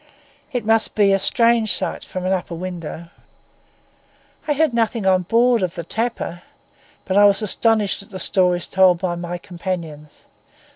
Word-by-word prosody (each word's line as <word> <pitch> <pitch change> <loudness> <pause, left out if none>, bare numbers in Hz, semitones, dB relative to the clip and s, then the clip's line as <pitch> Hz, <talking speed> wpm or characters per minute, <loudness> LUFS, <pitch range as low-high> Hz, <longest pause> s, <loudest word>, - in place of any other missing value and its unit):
It 245 -5 -3
must 225 0 +2
be 200 -2 +4
a 195 - +2
strange 230 0 +2
sight - - -3
from 185 0 -6
an 185 - +1
upper 180 -2 -3
window. 170 -2 -7 1.4
I 295 - +2
heard 300 -2 +1
nothing 230 -2 0
on 185 -1 +3
board 235 +4 +2
of 180 -2 -2
the 170 - -5
tapper; 220 -3 -4 0.6
but 190 - 0
I 205 - +7
was 200 +1 +3
astonished 215 -1 +1
at 200 - -16
the 190 - -8
stories 180 -2 +1
told 185 -2 +4
by 180 0 -2
my 175 0 -5
companions. 170 -5 -7
190 Hz, 160 wpm, -20 LUFS, 175-225 Hz, 1.4 s, I